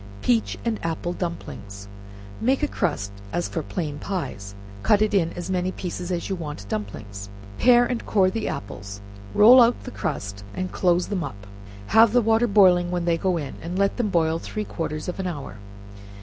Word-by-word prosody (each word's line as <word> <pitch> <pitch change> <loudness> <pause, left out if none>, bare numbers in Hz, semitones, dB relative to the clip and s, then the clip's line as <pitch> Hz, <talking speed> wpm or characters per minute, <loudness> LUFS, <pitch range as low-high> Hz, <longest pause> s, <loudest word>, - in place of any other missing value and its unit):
Peach 105 -3 +1
and 230 -2 -1
Apple 165 +1 -2
Dumplings. 125 - -6 0.5
Make 270 +5 +1
crust 105 - -1 0.2
as 175 - -1
for 165 - -3
plain 150 -2 -4
pies, 100 - -5 0.3
cut 205 - +4
it 215 - 0
in 170 -5 +2
as 175 +2 -5
many 185 0 0
pieces 180 -1 -5
as 175 -1 -2
you 195 - -2
want 150 - -7
dumplings, 100 -1 -5 0.3
pare 245 -1 +6
and 245 -2 -2
core 190 -3 +3
the 225 +2 -2
apples, 100 0 -6 0.4
roll 245 +5 +9
out 235 +1 +4
the 255 - -7
crust, 100 - -4
and 185 0 -3
close 180 -1 +1
them 195 -4 -1
up, 100 -6 -8 0.4
have 225 - +5
the 245 - +5
water 225 +2 +3
boiling 185 -4 +5
when 175 -1 -1
they 170 -1 +3
go 180 +1 0
in, 145 -4 -5
and 175 +3 -4
let 200 0 +1
them 235 -4 0
boil 165 -3 +1
three 215 +4 -5
quarters 155 -4 -4
of 180 - -4
an 190 - -1
hour. 145 - -6
175 Hz, 185 wpm, -24 LUFS, 145-200 Hz, 0.5 s, roll